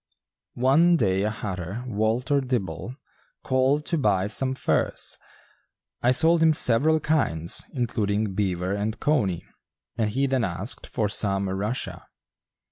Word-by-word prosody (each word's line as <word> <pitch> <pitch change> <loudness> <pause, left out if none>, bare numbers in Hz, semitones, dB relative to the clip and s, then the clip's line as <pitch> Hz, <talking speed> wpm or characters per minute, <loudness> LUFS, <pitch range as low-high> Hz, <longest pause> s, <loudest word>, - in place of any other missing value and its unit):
One 155 +8 +4
day 95 -6 +1
a 105 - +1
hatter, 100 0 -5
Walter 120 +5 0
Dibble, 125 -2 -3 0.5
called 135 +3 +1
to 165 - -1
buy 100 -7 +2
some 130 +6 0
furs. - - -1 0.8
I 120 - +3
sold 160 +6 +4
him 160 -1 +5
several 150 +6 +3
kinds, 95 - 0
including 105 -4 -1
"beaver" 95 -2 -1
and 105 +2 -3
"cony," 105 - 0 0.5
and 110 -2 +1
he 135 +6 0
then 130 -3 +1
asked 95 +4 -3
for 110 -4 -1
some 100 -1 0
"Russia." 100 +6 -3
110 Hz, 125 wpm, -25 LUFS, 100-135 Hz, 0.8 s, him